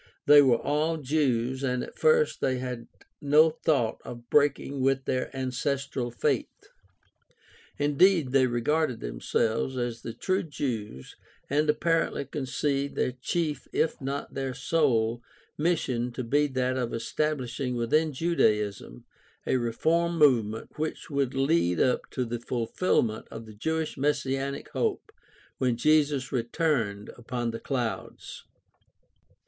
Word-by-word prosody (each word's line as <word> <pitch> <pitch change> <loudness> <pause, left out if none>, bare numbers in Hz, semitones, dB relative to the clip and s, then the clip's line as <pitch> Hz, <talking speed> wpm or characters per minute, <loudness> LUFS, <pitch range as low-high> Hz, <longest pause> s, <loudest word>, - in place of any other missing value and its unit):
They 145 0 +9
were 130 -4 +4
all 155 +5 0
Jews 130 -4 0
and 125 -2 -1
at - - -9
first 470 0 +3
they 130 -1 +1
had 125 -2 -5 0.3
no 150 +3 +5
thought 145 -7 0
of 120 -1 -10
breaking 140 -1 +2
with 135 0 +1
their 130 - -1
ancestral 130 0 -2
faith. 120 - 0 1.3
Indeed 145 0 +3
they 130 -1 +4
regarded 125 +3 0
themselves 110 - -1
as 120 -2 -3
the 115 - -6
true 185 0 0
Jews 115 - -5 0.4
and 150 +2 +2
apparently 165 -2 +1
conceived 140 0 -2
their - - 0
chief, 150 +3 -2
if 160 - 0
not 140 +1 -4
their 135 -1 -3
sole, 120 -5 +1 0.3
mission 130 -7 0
to 130 - -4
be 145 +5 +2
that 130 -1 -1
of 125 -2 -1
estabhshing 125 0 -2
within 150 +7 +1
Judaism 105 - 0 0.4
a - - +2
reform 165 +9 0
movement 115 -6 +2
which 155 0 -4
would 140 -2 0
lead 135 - +2
up 125 - +1
to 125 - -2
the 120 0 -4
fulfilment 115 -1 0
of 115 0 -8
the 110 - -12
Jewish 160 +7 -2
messianic 140 -1 -1
hope - - -2 0.5
when 125 -2 +1
Jesus 145 -1 +2
returned 120 - -1
upon 120 0 -3
the 115 - -6
clouds. 125 -5 -4
130 Hz, 130 wpm, -27 LUFS, 120-150 Hz, 1.3 s, They